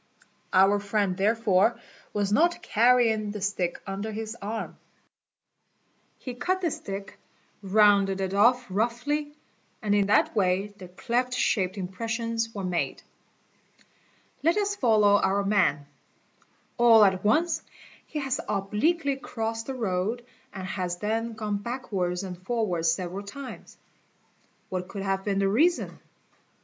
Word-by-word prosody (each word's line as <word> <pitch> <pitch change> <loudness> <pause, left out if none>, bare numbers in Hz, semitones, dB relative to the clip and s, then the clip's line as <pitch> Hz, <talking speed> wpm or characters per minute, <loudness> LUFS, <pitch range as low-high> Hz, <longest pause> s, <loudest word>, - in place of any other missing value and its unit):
Our 195 +2 +5
friend 200 -2 0
therefore 210 +1 +2 0.3
was 205 -1 -1
not 340 +7 +2
carrying 225 -2 +3
the 210 0 -5
stick 185 -3 -2
under 200 +2 -4
his 220 +1 -5
arm. 220 +3 -5 1.4
He 250 - -7
cut 365 +10 -1
the 340 -4 0
stick, 195 -4 -7 0.4
rounded 200 -1 +4
it 190 0 -2
off 245 +5 +4
roughly, 245 +9 -1 0.4
and 210 -2 0
in 200 -1 +3
that 205 - +3
way 195 +1 +1
the 185 - -9
cleft 245 +7 -1
shaped 190 -5 0
impressions" 225 +4 -2
were 200 -3 -6
made. 180 -2 -2 1.4
Let 335 +6 +2
us 405 -1 0
follow 215 - +4
our 200 +1 +1
man. 195 -8 +2 0.9
All 230 -3 +7
at 190 -1 +1
once 315 +10 +2 0.4
he 310 - -8
has 270 -1 -1
obliquely 270 - 0
crossed 225 -3 -4
the 270 - -4
road 220 +1 -2 0.3
and 190 -2 -7
has 180 -2 -3
then 225 +4 -2
gone 215 -2 -2
backwards 200 -6 -3
and 180 -2 -7
forwards 185 -6 0
several 185 +3 -4
times. 260 +6 -9 0.9
What 180 -1 -3
could 195 0 -6
have 195 -1 -1
been 200 -1 -1
the 195 0 +2
reason? 315 - +1
210 Hz, 130 wpm, -27 LUFS, 195-235 Hz, 1.4 s, All